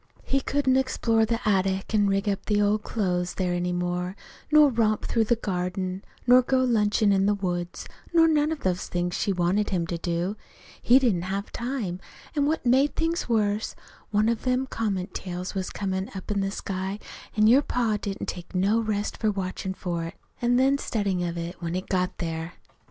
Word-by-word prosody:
"He 275 0 0
couldn't 265 -2 +2
explore 230 -4 +2
the 230 0 -2
attic 195 0 +1
an' 205 -1 +4
rig 195 +1 0
up 200 +1 -2
in 210 - +3
the - - +3
old 210 +1 +2
clothes 180 -5 -1
there 180 -2 0
any 175 0 -1
more, 180 +1 -2 0.4
nor 300 -2 +7
romp 220 -3 +1
through 225 -2 +1
the 240 - +3
garden, 185 -2 -3 0.2
nor 250 +1 +7
go 260 +1 +2
lunchin' 215 -3 +3
in 195 0 +3
the 205 - +3
woods, 175 -3 -3 0.3
nor 330 -1 +6
none 305 -1 +2
of 315 - -3
the 185 - +2
things 175 0 -3
she 200 - 0
wanted 185 +3 +1
him 180 -4 0
to 170 0 -4
do. 175 +4 -2 0.4
He 245 - +6
didn't 230 -10 +2
have 200 +1 -3
time. 235 -8 -3 0.4
An' 285 -1 +2
what 310 -3 -1
made 265 +4 +3
things 330 -4 -1
worse, 210 -2 +1 0.3
one 210 +1 +2
of 230 -1 0
them 255 +1 +1
comet 205 -7 -2
tails 180 0 -5
was 190 -2 -2
comin' 190 -1 -3
up 190 +2 -6
in 205 - +1
the 195 - 0
sky, 195 0 -4 0.4
an' 215 - +5
your 245 +6 +7
pa 235 -6 0
didn't 195 -1 -4
take 175 +1 -7
no 200 +5 +3
rest 215 -2 -2
for 215 - +1
watchin' 190 -1 -3
for 170 -3 -3
it, 165 - -7 0.3
an' 240 0 +3
then 270 +2 +3
studyin' 200 -8 -1
of 170 - -5
it 170 +2 -6
when 170 0 -3
it 185 - -3
got 180 -1 +1
here. 165 0 -4
205 Hz, 200 wpm, -26 LUFS, 185-235 Hz, 0.4 s, nor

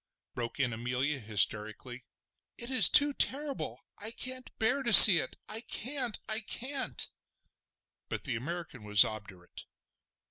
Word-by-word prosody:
broke 120 +1 -9
in 125 -4 -3
Amelia 125 +5 -6
hysterically. 110 +3 -5 0.5
"It 235 +2 -7
is 260 - +4
too 290 -1 +3
terrible! 280 +1 -7 0.2
I 210 - -9
can't 255 +2 -9
bear 250 +5 -3
to 240 -3 -4
see 195 -4 +11
it!—I 215 +10 -9
can't! 250 -1 -6
I 215 0 -4
can't!" 260 +5 -6 1.0
But - - -9
the 130 -5 -6
American 160 0 -10
was 105 -1 +4
obdurate. 100 -5 -12
170 Hz, 130 wpm, -26 LUFS, -, 1.0 s, see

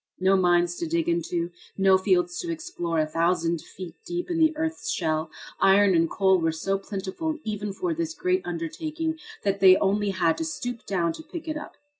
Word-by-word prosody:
No 190 +1 +4
mines 175 -2 +3
to 170 - -3
dig 165 +1 0
into, 170 0 -1 0.3
no 195 -1 +5
fields 180 -2 +1
to 345 -1 -3
explore 315 - -3
a 155 - +3
thousand 165 +1 0
feet 180 -3 -9
deep 350 0 -4
in 335 - 0
the 315 -1 +5
earth's 320 +1 -2
shell. 155 0 -1 0.3
Iron 195 0 +5
and 165 -1 +3
coal 190 -1 +3
were 165 0 +2
so 195 +5 -1
plentiful 200 - -4
even 210 -1 -3
for 345 - -2
this 325 0 -3
great 370 0 +1
undertaking 310 - -3 0.2
that 200 -1 0
they 185 -1 +8
only 205 +1 +1
had 175 -4 +1
to - - -1
stoop 245 -7 -5
down 170 -4 0
to - - -9
pick 325 +1 -8
it 310 - -2
up. 300 - -8
195 Hz, 195 wpm, -26 LUFS, -, 0.3 s, they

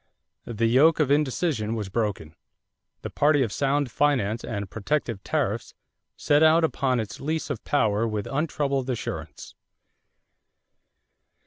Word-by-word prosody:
The 115 -1 -1
yoke 140 +8 +4
of 145 -3 +2
indecision 140 -5 0
was 105 -3 -4
broken. 95 -7 -3 0.7
The - - -5
party 145 -2 +3
of 115 - -3
sound 140 0 0
finance 120 -7 +1
and 100 -3 -4
protective 115 -1 -3
tariffs - - -2 0.4
set 145 +1 +2
out 160 +1 +5
upon 135 -5 +1
its 110 -2 -5
lease 160 +2 -3
of - - -5
power 110 -5 +1
with 105 -2 -3
untroubled 140 -2 -1
assurance. 125 - -5
130 Hz, 125 wpm, -25 LUFS, 110-145 Hz, 0.7 s, out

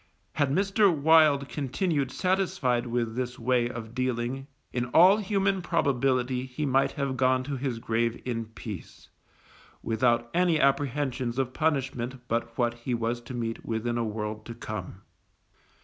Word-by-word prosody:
Had 145 -3 +1
Mr. 195 +5 +3
Wild 155 -2 +4
continued 145 +1 -1
satisfied 150 -11 0
with 115 -1 -1
this 125 -1 -3
way 120 0 +1
of 115 -2 -7
dealing 130 +1 -2 0.3
in 125 0 0
all 175 +11 +6
human 195 -2 0
probability 130 -5 +1
he 130 +4 -3
might 135 0 +2
have 140 -2 -2
gone 130 0 +2
to 140 +1 -4
his 130 -2 -2
grave 115 0 -1
in 115 -2 -2
peace, 110 -4 -9 0.7
without 120 0 +1
any 175 -2 +3
apprehensions 135 -3 0
of 130 -1 -1
punishment 130 -4 -1
but 115 0 -2
what 120 -1 +1
he 120 +1 -3
was 115 +1 -2
to 125 +1 -8
meet 115 -1 -3
within 120 +1 -2
a - - +1
world 110 0 -4
to 115 - -7
come. 100 -4 -7
125 Hz, 150 wpm, -27 LUFS, 120-140 Hz, 0.7 s, all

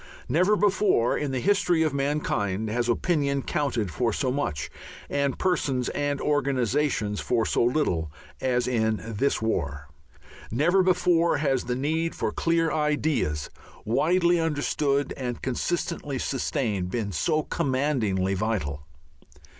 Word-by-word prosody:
Never 180 +10 +3
before 200 - +2
in 150 - -2
the 130 -1 -1
history 180 -1 +2
of 155 -3 0
mankind 110 -8 -1
has 120 +1 0
opinion 140 0 +1
counted 130 - -1
for 120 +3 0
so 130 +4 -1
much 100 - -2 0.4
and 140 -2 0
persons 140 -9 0
and 145 -1 -1
organizations 135 -6 0
for 115 -3 +1
so - - +1
little 115 - 0 0.3
as 125 -2 0
in 110 -3 +1
this 115 +2 -1
war. 70 -9 -2 0.6
Never 165 - +3
before 180 -2 +3
has 135 -3 0
the 125 0 -1
need 160 +5 -1
for - - -1
clear 165 -1 +1
ideas, 150 - 0 0.3
widely 170 - +3
understood 145 -2 0
and 125 -3 -4
consistently 145 +2 -2
sustained, 110 -8 -1
been 105 0 -2
so 155 - 0
commandingly 125 -11 0
vital. 85 -9 -2
135 Hz, 125 wpm, -26 LUFS, 115-155 Hz, 0.6 s, Never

